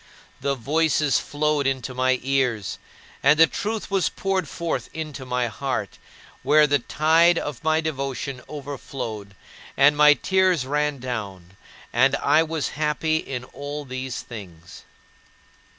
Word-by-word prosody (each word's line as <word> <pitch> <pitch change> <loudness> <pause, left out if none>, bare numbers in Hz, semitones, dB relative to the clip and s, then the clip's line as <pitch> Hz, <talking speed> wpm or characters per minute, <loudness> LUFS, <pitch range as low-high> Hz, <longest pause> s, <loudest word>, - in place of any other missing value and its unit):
The 140 +1 -1
voices 150 -1 +1
flowed 150 +1 0
into 130 -1 -2
my 130 0 +1
ears; 125 -6 0 0.4
and 140 +3 +5
the 165 - +8
truth 215 +3 -4
was 195 -3 +2
poured 190 -4 -2
forth 165 -8 -3
into 150 -4 -6
my 125 0 0
heart, 130 +3 -4 0.4
where 155 0 +5
the 145 -1 +2
tide 165 +6 +3
of 145 -6 -4
my 160 0 +2
devotion 140 -3 -4
overflowed, 130 -8 -6 0.4
and 145 +2 +6
my 150 0 +7
tears 185 -6 +2
ran 150 +1 0
down, 100 -8 -6 0.4
and 135 +3 +4
I 155 +2 +3
was 160 -2 -2
happy 155 +1 0
in 130 -5 -5
all 145 +3 -7
these 130 -1 -5
things. 90 -6 -11
140 Hz, 135 wpm, -24 LUFS, 125-155 Hz, 0.4 s, the